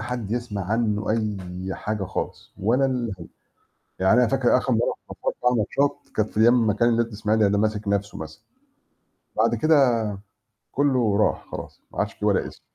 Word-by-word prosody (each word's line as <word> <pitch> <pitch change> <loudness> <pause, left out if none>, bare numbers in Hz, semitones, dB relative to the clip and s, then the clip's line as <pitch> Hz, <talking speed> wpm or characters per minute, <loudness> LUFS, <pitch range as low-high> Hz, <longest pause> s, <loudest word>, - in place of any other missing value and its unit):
حد 120 -4 -4
يسمَع 115 -5 -3
عنّه 105 0 0
أي 95 -4 -3
حاجة 105 -1 -3
خالص، 95 - -5
ولا 120 +7 +2
الهوا 115 -9 -3 0.7
يعني 95 +6 +4
أنا 125 - +4
فاكر 130 +1 +3
آخر 130 +1 0
مرّة 115 0 +1
شفت - - -4
فيها 125 - +4
ماتشات 135 +6 0
كانت 110 -1 +1
في 110 - -1
أيام 120 +2 +6
أمّا 115 -4 +3
كان 120 +3 +3
النادي 115 0 +2
الإسماعيلي 105 0 +1
انا 100 0 +2
ماسك 105 -1 -1
نفْسَه 100 0 -1
مثلًا. 80 0 -9 0.9
بعد - - +3
كده 145 -6 +4 0.8
كله 130 -7 +2
راح 105 - +1
خلاص، - - -8
ما - - -1
عدش - - -2
في - - -5
ولا - - +2
اسم. - - -13
110 Hz, 175 wpm, -24 LUFS, 100-120 Hz, 0.9 s, أيام